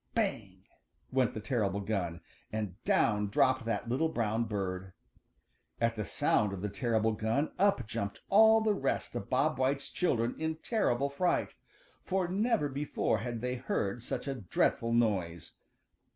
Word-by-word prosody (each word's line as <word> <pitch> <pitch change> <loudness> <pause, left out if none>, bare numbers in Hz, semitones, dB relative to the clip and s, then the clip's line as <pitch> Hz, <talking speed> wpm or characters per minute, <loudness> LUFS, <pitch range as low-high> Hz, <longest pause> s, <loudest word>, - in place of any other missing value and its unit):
"Bang!" - - -2 0.5
went 130 -2 +1
the - - -3
terrible 105 -4 0
gun, 95 -5 -2 0.3
and 105 -4 -3
down 105 -2 +2
dropped 130 +4 +2
that 115 0 -2
little 135 +7 +1
brown 115 -4 0
bird. 95 -3 -3 0.9
At 115 0 +1
the 105 -2 -3
sound 100 +4 +1
of 95 0 -6
the 105 - -1
terrible 110 0 +1
gun 110 +7 0
up 200 - +3
jumped 100 -1 -4
all 220 +2 +6
the 215 -1 +2
rest 195 - -2
of - - -4
Bob - - +1
White's 135 +1 0
children 120 -9 +1
in 160 0 -1
terrible 140 - 0
fright, 175 +6 0 0.5
for 185 -1 0
never 205 -2 +1
before 140 -5 -1
had 115 +1 -4
they 125 +1 -2
heard 110 -1 -2
such 125 - -4
a 140 - 0
dreadful 115 +1 0
noise. 95 -8 0
115 Hz, 150 wpm, -31 LUFS, 105-140 Hz, 0.9 s, all